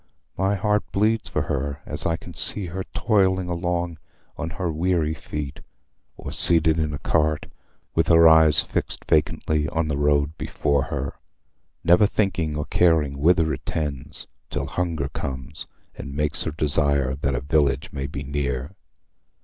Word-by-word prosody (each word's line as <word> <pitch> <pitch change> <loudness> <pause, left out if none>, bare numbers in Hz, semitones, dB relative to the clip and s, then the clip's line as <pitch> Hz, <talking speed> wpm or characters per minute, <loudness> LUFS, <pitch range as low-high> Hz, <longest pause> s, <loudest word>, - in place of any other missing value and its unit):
My 95 +2 +1
heart 105 +1 +1
bleeds 110 +2 +1
for - - -1
her 70 +1 -3
as - - -3
I 85 0 0 0.2
see 105 - +1
her 90 +2 -5
toiling 95 -3 +1
along 85 -1 -2 0.4
on 80 0 -4
her 90 0 -3
weary 80 -1 0
feet, 75 -2 -6 0.6
or - - -7
seated 80 -1 +5
in 75 -1 0
a 75 - -4
cart, 75 +1 0 0.5
with - - +1
her 80 0 +7
eyes 80 -1 +6
fixed - - -4
vacantly 75 0 +1
on 80 -1 -1
the 70 - -1
road 75 +1 +2
before 70 -1 0
her, 70 -4 -5 0.6
never 90 +5 +5
thinking 90 -8 -1
or 75 0 -2
caring 80 -7 +2
whither 80 0 +3
it - - -7
tends, 75 -4 -3 0.2
till - - -3
hunger 85 -6 -2
comes 65 -2 -6 0.3
and 70 - -8
makes 75 0 -1
her 80 - -2
desire 70 -3 +2
that 70 -2 0
a - - -2
village 70 -1 +1
may 70 -1 -4
be 70 +1 -6
near. 70 0 -3
80 Hz, 155 wpm, -23 LUFS, 70-85 Hz, 0.6 s, her